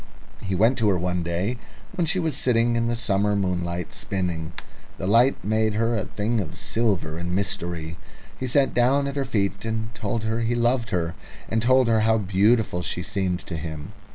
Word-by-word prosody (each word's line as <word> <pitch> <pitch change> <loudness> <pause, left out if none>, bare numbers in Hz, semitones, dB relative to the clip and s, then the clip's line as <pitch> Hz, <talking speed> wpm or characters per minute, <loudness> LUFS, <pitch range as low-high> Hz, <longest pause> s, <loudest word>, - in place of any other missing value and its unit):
He 95 -1 -2
went 115 +7 +3
to 110 -2 +3
her 95 - +2
one 90 0 -1
day 85 +8 -1 0.4
when 170 -2 0
she 175 - +3
was 160 -6 0
sitting 120 -2 +2
in 115 0 +1
the 120 - 0
summer 105 -2 +1
moonlight 90 -3 -2
spinning. 85 -4 -3 0.4
The 95 - -4
light 115 +7 +4
made 110 +1 +1
her 115 +2 +1
a 105 - -1
thing 110 +3 -1
of 90 -7 -5
silver 100 -9 -1
and 90 +1 -2
mystery. 85 -4 -2 0.4
He 130 - -4
sat 135 +2 +3
down 130 +4 +3
at 140 0 -3
her 140 -1 -1
feet 100 -5 -1
and 110 0 -3
told 110 +1 -3
her 115 +1 -1
he 115 +1 0
loved 120 0 +1
her, 85 -2 -1 0.4
and 110 0 +1
told 130 +1 +4
her 115 -1 +3
how 110 +1 +3
beautiful 100 0 +2
she 90 0 -3
seemed 95 -2 -1
to 85 - -7
him. 80 -2 -6
105 Hz, 195 wpm, -24 LUFS, 90-120 Hz, 0.4 s, light